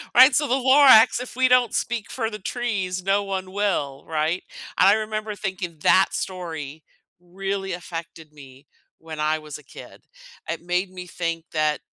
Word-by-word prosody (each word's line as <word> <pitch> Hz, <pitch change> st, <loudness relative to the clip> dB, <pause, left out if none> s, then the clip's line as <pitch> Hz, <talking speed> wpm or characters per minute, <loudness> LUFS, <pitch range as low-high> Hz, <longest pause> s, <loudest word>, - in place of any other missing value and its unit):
Right? 260 Hz, +3 st, +8 dB
So 295 Hz, -1 st, +2 dB
the -, -, 0 dB
Lorax, 260 Hz, -3 st, +6 dB
if 250 Hz, -, -8 dB
we 260 Hz, 0 st, +3 dB
don't 250 Hz, -3 st, +3 dB
speak 230 Hz, -3 st, -2 dB
for 225 Hz, -3 st, -2 dB
the 210 Hz, -1 st, -8 dB
trees, 190 Hz, -5 st, -3 dB
no 195 Hz, +2 st, +1 dB
one 190 Hz, -1 st, -4 dB
will, 180 Hz, -9 st, -2 dB
right? 160 Hz, +3 st, -1 dB, 0.3 s
I 195 Hz, +2 st, +6 dB
remember 215 Hz, -1 st, -3 dB
thinking 185 Hz, -5 st, -5 dB
that 190 Hz, -, +5 dB
story 160 Hz, -5 st, -5 dB, 0.4 s
really 195 Hz, +1 st, -4 dB
affected 165 Hz, -3 st, -8 dB
me 135 Hz, -1 st, -15 dB, 0.3 s
when 160 Hz, -1 st, -9 dB
I 155 Hz, +1 st, +1 dB
was 150 Hz, -1 st, -9 dB
a 150 Hz, -, -17 dB
kid. -, -, -13 dB, 0.5 s
It -, -, -3 dB
made 180 Hz, +2 st, -1 dB
me 180 Hz, -1 st, -9 dB
think 165 Hz, -1 st, -4 dB
that, 155 Hz, -1 st, +1 dB
185 Hz, 165 wpm, -23 LUFS, 160-215 Hz, 0.5 s, Right